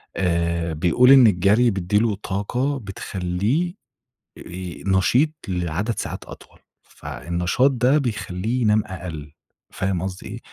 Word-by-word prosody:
آآ 85 Hz, -2 st, 0 dB
بيقول 90 Hz, -, +4 dB
إن 135 Hz, -3 st, +8 dB
الجري 105 Hz, +5 st, +3 dB
بيدّي 95 Hz, +1 st, 0 dB
له 110 Hz, -2 st, +1 dB
طاقة 110 Hz, +8 st, -2 dB
بتخلّيه 100 Hz, -, -2 dB, 0.7 s
آآ 90 Hz, 0 st, -8 dB
نشيط 100 Hz, -, +3 dB, 0.2 s
لعدد 90 Hz, +5 st, -2 dB
ساعات -, -, -5 dB
أطول. -, -, -14 dB, 0.2 s
فالنشاط 90 Hz, +10 st, -1 dB
ده 130 Hz, +3 st, +2 dB
بيخلّيه 110 Hz, -2 st, -2 dB
ينام 105 Hz, -1 st, +3 dB
أقل، 80 Hz, -6 st, -7 dB, 0.4 s
فاهم 95 Hz, -2 st, -2 dB
قصدي 95 Hz, 0 st, -6 dB
إيه؟ 110 Hz, +3 st, -6 dB
95 Hz, 120 wpm, -22 LUFS, 90-120 Hz, 0.7 s, إن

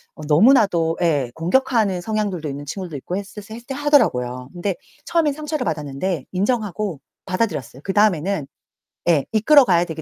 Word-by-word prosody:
어 -, -, -11 dB
너무나도 170 Hz, -, +4 dB
예 145 Hz, -8 st, +1 dB
공격하는 200 Hz, +1 st, +1 dB
성향들도 200 Hz, -7 st, -2 dB
있는 140 Hz, +1 st, -6 dB
친구들도 175 Hz, 0 st, -6 dB
있고 175 Hz, +7 st, -4 dB
했을 205 Hz, +1 st, -7 dB
했을 230 Hz, +2 st, -9 dB
때 270 Hz, -, -4 dB
하더라고요. 130 Hz, -, +1 dB
근데 180 Hz, +2 st, -2 dB, 0.3 s
처음엔 325 Hz, -4 st, +1 dB
상처를 300 Hz, -2 st, -3 dB
받았는데 150 Hz, +1 st, -3 dB
인정하고 205 Hz, -, -1 dB, 0.3 s
받아들였어요. 170 Hz, -, -2 dB
그다음에는 195 Hz, -5 st, +1 dB, 0.6 s
예 150 Hz, -5 st, +3 dB
이끌어 265 Hz, +6 st, +6 dB
가야 175 Hz, -4 st, +3 dB
되기 160 Hz, -1 st, -6 dB
185 Hz, 400 characters per minute, -21 LUFS, 155-220 Hz, 0.6 s, 이끌어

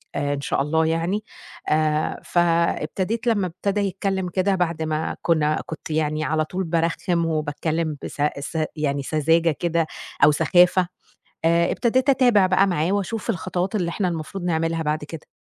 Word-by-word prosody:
آآ 145 Hz, 0 st, 0 dB
إن 140 Hz, -, -4 dB
شاء 140 Hz, -, 0 dB
الله 160 Hz, +3 st, +1 dB
يعني." 165 Hz, +6 st, 0 dB, 0.5 s
آآ 155 Hz, 0 st, +1 dB
فابتديت 175 Hz, +5 st, 0 dB
لمّا 205 Hz, -5 st, +2 dB
ابتدى 195 Hz, +4 st, -2 dB
يتكلّم 190 Hz, -1 st, -1 dB
كده 190 Hz, +2 st, +1 dB
بعد 170 Hz, -3 st, -1 dB
ما 155 Hz, 0 st, -2 dB
كُنّا 155 Hz, -2 st, +1 dB
كنت 160 Hz, -, -8 dB
يعني 155 Hz, 0 st, 0 dB
على 155 Hz, 0 st, 0 dB
طول 185 Hz, +4 st, -3 dB
بارخِّم 170 Hz, 0 st, 0 dB
وباتكلّم 155 Hz, 0 st, -2 dB
بس -, -, -6 dB, 0.2 s
س 145 Hz, +3 st, -5 dB, 0.2 s
يعني 140 Hz, -2 st, -1 dB
سذاجة 165 Hz, +3 st, +2 dB
كده 170 Hz, -2 st, 0 dB, 0.4 s
أو 150 Hz, -, +8 dB
سخافة، 175 Hz, +3 st, +4 dB, 0.6 s
آآ 170 Hz, +1 st, +3 dB
ابتديت 255 Hz, +3 st, +1 dB
أتابع 245 Hz, -7 st, +4 dB
بقى 185 Hz, +1 st, +3 dB
معاه 175 Hz, -1 st, 0 dB
وأشوف 205 Hz, +3 st, -2 dB
الخطوات 185 Hz, 0 st, -2 dB
اللي 180 Hz, -5 st, 0 dB
إحنا 185 Hz, +1 st, -1 dB
المفروض 170 Hz, +2 st, -5 dB
نعملها 165 Hz, -1 st, 0 dB
بعد 150 Hz, 0 st, -1 dB
كده. 155 Hz, +1 st, -9 dB
165 Hz, 155 wpm, -23 LUFS, 155-185 Hz, 0.6 s, أو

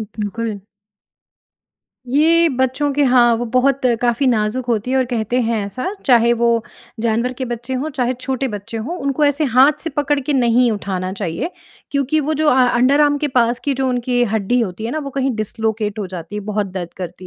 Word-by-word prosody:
बिल्कुल। 215 Hz, 0 st, -4 dB, 1.5 s
ये 330 Hz, +4 st, +4 dB
बच्चों 260 Hz, +2 st, 0 dB
के 290 Hz, -, +1 dB
हाँ, 245 Hz, -2 st, +5 dB
वो 240 Hz, -, -3 dB
बहुत 255 Hz, +3 st, +2 dB, 0.2 s
काफ़ी 240 Hz, +2 st, +1 dB
नाज़ुक 235 Hz, +1 st, 0 dB
होती 235 Hz, +1 st, -1 dB
हैं 265 Hz, -, +1 dB
और 260 Hz, -, +2 dB
कहते 240 Hz, +2 st, 0 dB
हैं 230 Hz, -1 st, 0 dB
ऐसा, 255 Hz, -, -4 dB
चाहे 235 Hz, -2 st, +5 dB
वो 235 Hz, -1 st, +2 dB, 0.4 s
जानवर 235 Hz, +2 st, 0 dB
के 260 Hz, +1 st, -5 dB
बच्चे 240 Hz, +1 st, -5 dB
हों 310 Hz, -, -3 dB
चाहे, 255 Hz, -2 st, -1 dB
छोटे 260 Hz, +1 st, -3 dB
बच्चे 210 Hz, +2 st, -6 dB
हों 265 Hz, +11 st, -4 dB
उनको 280 Hz, +2 st, 0 dB
ऐसे 290 Hz, +2 st, +2 dB
हाथ 265 Hz, +3 st, +5 dB
से 325 Hz, -, -4 dB
पकड़ 290 Hz, -1 st, 0 dB
के 290 Hz, +3 st, -2 dB
नहीं 245 Hz, -2 st, +3 dB
उठाना 190 Hz, -2 st, -3 dB
चाहिए, 190 Hz, -, -3 dB, 0.4 s
क्योंकि 280 Hz, +2 st, +1 dB
वो 305 Hz, +2 st, -1 dB
जो 310 Hz, 0 st, +1 dB
अ 255 Hz, -2 st, +5 dB
अंडरआर्म 285 Hz, +4 st, +3 dB
के 295 Hz, -, -1 dB
पास 240 Hz, -1 st, +2 dB
की 280 Hz, -2 st, +1 dB
जो 265 Hz, 0 st, -1 dB
उनकी 245 Hz, 0 st, 0 dB
हड्डी 220 Hz, +3 st, +1 dB
होती 215 Hz, 0 st, -3 dB
है 235 Hz, -, -2 dB
ना 310 Hz, -, -2 dB
वो 280 Hz, -2 st, -5 dB
कहीं 270 Hz, 0 st, -1 dB
डिस्लॉकेट 215 Hz, 0 st, -2 dB
हो 200 Hz, -, -3 dB
जाती 180 Hz, +1 st, -8 dB
है -, -, -3 dB
बहुत 210 Hz, -1 st, -1 dB
दर्द 185 Hz, -2 st, -6 dB
करती 185 Hz, 0 st, -7 dB
245 Hz, 200 wpm, -19 LUFS, 220-275 Hz, 1.5 s, हाँ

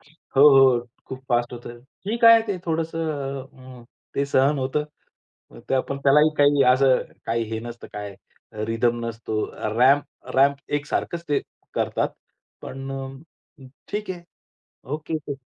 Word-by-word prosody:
हो, 145 Hz, -2 st, -1 dB
हो. 130 Hz, -3 st, +5 dB, 0.2 s
खूप 130 Hz, 0 st, -7 dB
फास्ट 120 Hz, 0 st, +1 dB
होतं. 120 Hz, 0 st, -9 dB, 0.2 s
ठीक 230 Hz, +3 st, -1 dB
आहे 230 Hz, -1 st, +9 dB
ते 200 Hz, -3 st, -2 dB
थोडंसं 165 Hz, 0 st, -2 dB, 0.4 s
अ, 130 Hz, -1 st, -14 dB
अ, -, -, -16 dB, 0.3 s
ते 140 Hz, -, +1 dB
सहन 140 Hz, +1 st, +2 dB
होतं. 135 Hz, +3 st, -1 dB, 0.8 s
ते -, -, +1 dB
आपण 135 Hz, +1 st, -1 dB
त्यालाही 150 Hz, +3 st, +5 dB
काही 145 Hz, -1 st, +5 dB
असं 130 Hz, 0 st, +3 dB, 0.2 s
काही 115 Hz, 0 st, 0 dB
हे 110 Hz, -, -2 dB
नसतं 120 Hz, 0 st, -9 dB
काय 105 Hz, -1 st, -6 dB, 0.5 s
रिदम 115 Hz, +1 st, 0 dB
नसतो. 110 Hz, -2 st, -3 dB, 0.3 s
रॅम्प 140 Hz, +3 st, +5 dB, 0.3 s
रॅम्प 140 Hz, +1 st, +5 dB, 0.2 s
एक 145 Hz, -, -13 dB
सारखंच 170 Hz, +3 st, -3 dB
ते 145 Hz, -, +2 dB, 0.3 s
करतात. -, -, 0 dB, 0.5 s
पण 135 Hz, +1 st, -7 dB
अ, 135 Hz, 0 st, -13 dB, 0.2 s
ठीक 210 Hz, -1 st, -4 dB
आहे 175 Hz, -2 st, -6 dB, 0.7 s
ओके 155 Hz, +1 st, -3 dB
ते 145 Hz, -2 st, -6 dB
135 Hz, 145 wpm, -23 LUFS, 120-150 Hz, 0.8 s, आहे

